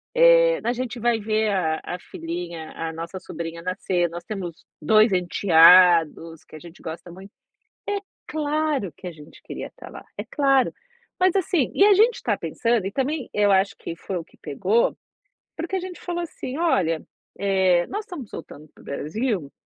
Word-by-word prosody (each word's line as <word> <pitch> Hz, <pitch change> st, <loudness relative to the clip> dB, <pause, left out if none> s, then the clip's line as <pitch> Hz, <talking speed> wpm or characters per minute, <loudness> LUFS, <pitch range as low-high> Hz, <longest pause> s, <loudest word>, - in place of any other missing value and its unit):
eh, -, -, +6 dB
a 235 Hz, -, +1 dB
gente 250 Hz, -1 st, -4 dB
vai 235 Hz, 0 st, +1 dB
ver 215 Hz, 0 st, 0 dB
a 160 Hz, -5 st, 0 dB
a 180 Hz, -, -5 dB
filhinha, 170 Hz, -1 st, -6 dB
a 165 Hz, 0 st, -4 dB
nossa 165 Hz, +3 st, -6 dB
sobrinha 165 Hz, -2 st, -7 dB
nascer, 185 Hz, -1 st, 0 dB
nós 170 Hz, +1 st, -8 dB
temos 180 Hz, -4 st, -7 dB, 0.2 s
2 215 Hz, +7 st, +5 dB
enteados 175 Hz, -2 st, +5 dB
que -, -, -14 dB
a -, -, -9 dB
gente 170 Hz, +2 st, -14 dB
gosta 165 Hz, +2 st, -7 dB
muito. 190 Hz, +3 st, -12 dB, 0.6 s
É 410 Hz, 0 st, 0 dB, 0.3 s
claro 300 Hz, -, -1 dB
que -, -, -11 dB
a 180 Hz, -, -4 dB
gente 150 Hz, -2 st, -15 dB
queria -, -, -7 dB
estar -, -, -13 dB
lá, -, -, -11 dB
é -, -, -3 dB
claro. 275 Hz, -3 st, +2 dB, 0.5 s
Mas, 370 Hz, 0 st, +4 dB
assim 345 Hz, -7 st, +1 dB
e 395 Hz, -, +5 dB
a 410 Hz, 0 st, +7 dB
gente 445 Hz, +5 st, +4 dB
está -, -, -1 dB
pensando, 230 Hz, -4 st, 0 dB
e -, -, -2 dB
também 270 Hz, +2 st, -2 dB
eu 205 Hz, -1 st, +3 dB
acho 195 Hz, +1 st, +2 dB
que 165 Hz, -, -6 dB
foi 185 Hz, +3 st, -5 dB
o 170 Hz, -, -4 dB
que -, -, -25 dB
pegou, 185 Hz, +10 st, +1 dB, 0.6 s
porque 340 Hz, +4 st, -3 dB
a -, -, -1 dB
gente 360 Hz, 0 st, -8 dB
falou 345 Hz, -1 st, -3 dB
assim: 275 Hz, -5 st, -6 dB
"Olha, 180 Hz, -, +1 dB, 0.3 s
eh, 190 Hz, -3 st, +2 dB
nós 420 Hz, +1 st, -4 dB
estamos 290 Hz, -, -8 dB
voltando 155 Hz, -1 st, -10 dB
para -, -, -19 dB
o -, -, -19 dB
Brasil, 170 Hz, -, -3 dB
195 Hz, 185 wpm, -24 LUFS, 170-280 Hz, 0.6 s, a